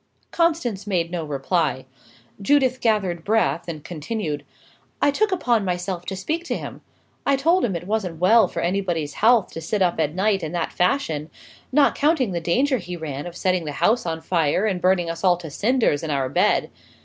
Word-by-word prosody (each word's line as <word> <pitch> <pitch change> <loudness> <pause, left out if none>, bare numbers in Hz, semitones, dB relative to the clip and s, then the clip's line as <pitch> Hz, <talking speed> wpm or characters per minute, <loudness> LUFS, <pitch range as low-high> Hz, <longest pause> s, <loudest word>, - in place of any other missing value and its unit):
Constance 305 - 0
made 175 -4 0
no 175 -2 -3
reply. 150 -1 -1 0.6
Judith 260 +3 +2
gathered 195 -7 0
breath, 215 -5 +1
and 155 -3 -6
continued: 155 -2 -4 0.6
"I 285 - +3
took 425 +8 +1
upon 245 - +1
myself 180 -1 -3
to 190 - -3
speak 315 - -3
to - - -2
him. - - -8 0.4
I 280 - +3
told 335 +7 +2
him 195 -6 0
it 170 - -5
wasn't 195 -5 -2
well 215 +3 +5
for - - -4
anybody's 175 -5 -1
health, 225 -1 +3
to 165 - -7
sit 195 +4 0
up 175 -2 0
at 155 0 0
night, 195 +1 +1
in 160 0 -5
that 170 -2 -2
fashion; 165 - 0 0.4
not 295 -2 +4
counting 290 - +1
the 170 -1 -2
danger 255 - +1
he 180 -1 -7
ran 145 -1 -5
of 175 0 -9
setting 185 -3 0
the 150 - -4
house 225 - +1
on 160 -1 -3
fire 165 +3 +1
and 190 -4 -1
burning 180 -2 +2
us 165 +2 -5
all 180 -2 +4
to 165 -3 -9
cinders 220 - +1
in 160 - -5
our 135 -3 0
beds. 140 - +2
180 Hz, 195 wpm, -23 LUFS, 165-225 Hz, 0.6 s, well